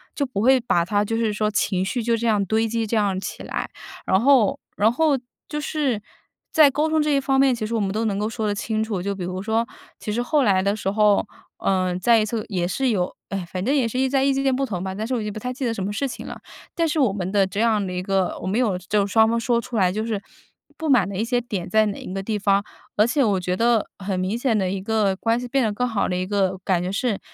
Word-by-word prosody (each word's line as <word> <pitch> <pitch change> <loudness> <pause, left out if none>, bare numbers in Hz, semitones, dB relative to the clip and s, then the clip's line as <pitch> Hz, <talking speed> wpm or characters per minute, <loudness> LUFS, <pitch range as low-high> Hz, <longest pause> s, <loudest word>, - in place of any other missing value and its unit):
就 285 - 0
不 210 -6 -3
会 260 +2 +5
把 175 -8 +1
它 205 +2 +1
就 225 +2 -2
是 225 -2 0
说 210 0 0
情 190 -3 0
绪 230 +5 -2
就 235 0 +2
这 230 +1 -1
样 210 -3 +2
堆 220 +3 +1
积 230 0 -1
这 220 - -2
样 200 -3 +1
起 - - -6
来。 - - -4 0.4
然 190 - +3
后 255 -5 +4 0.2
然 215 +2 +3
后 295 +1 +2 0.3
就 300 - -3
是 290 -7 -1 0.5
在 310 -4 +7
沟 300 +3 0
通 315 0 +2
这 300 - 0
一 - - +3
方 270 0 +1
面， 270 -2 +5
其 220 - -3
实 230 - -4
我 225 - +1
们 195 -2 0
都 220 +2 -1
能 200 -2 -1
够 210 +1 -1
说 220 -2 -3
得 205 - +1
清 220 +1 -1
楚。 210 -5 -3
就 200 +2 -2
比 185 - -5
如 185 +1 -4
说， 225 +2 0 0.3
其 210 - -4
实 235 - 0
后 285 +3 +2
来 190 -4 +3
的 200 +1 +1
时 195 -2 -2
候， 210 -1 +3 0.3
呃， 185 -2 0
再 235 +2 +4
一 215 - +1
次 215 0 -3
也 175 -3 -1
是 265 +7 0
有 185 -5 -1
唉， 195 -2 -3
反 185 -1 -3
正 265 +7 +1
也 255 -5 +2
是 250 +3 -3
意 265 - +3
在 270 0 +2
意 275 - +3
见 270 -1 +1
不 275 - 0
同 185 -8 -4
吧， 190 0 -3
但 215 +2 -3
是 260 - -2
我 235 - -1
也 210 0 -3
不 215 - -6
太 250 +4 -4
记 265 +1 -4
得 230 - 0
什 195 - -4
么 200 - -2
事 275 +6 -1
情 255 - -7
了。 - - -7 0.4
但 335 -1 +1
是 305 0 -1
我 245 -8 +3
们 190 -2 -3
的 200 -2 +3
这 200 +2 -5
样 220 -3 +2
的 180 - -4
一 180 - -2
个 190 -1 0
我 - - -4
们 205 +5 0
有 215 -7 +1
就 200 +2 0
双 220 +2 +4
方 230 - +1
说 235 0 +1
出 235 - -8
来 185 -3 +3
就 215 +3 -2
是 215 -3 -2 0.6
不 320 - -4
满 240 -9 +4
的 200 - -6
一 220 - 0
些 245 +1 +1
点 200 -7 -4
在 220 0 +4
哪 200 - -4
一 - - -8
个 195 - -3
地 215 0 -2
方。 200 0 +2 0.3
而 210 - +4
且 265 +3 +2
我 200 -4 +2
觉 180 0 -1
得 230 0 +2
很 190 -1 -2
明 190 +5 -1
显 240 -3 +1
的 190 -3 0
一 195 0 -3
个 205 -1 +1
关 230 +4 0
系 245 - -5
变 270 +1 +1
得 220 - +1
更 250 +4 -1
好 220 -4 0
的 180 - -1
一 185 - -1
个 190 -1 0
感 185 -3 +1
觉 180 +1 -2
是， 220 -1 -1
215 Hz, 310 characters per minute, -23 LUFS, 195-245 Hz, 0.6 s, 在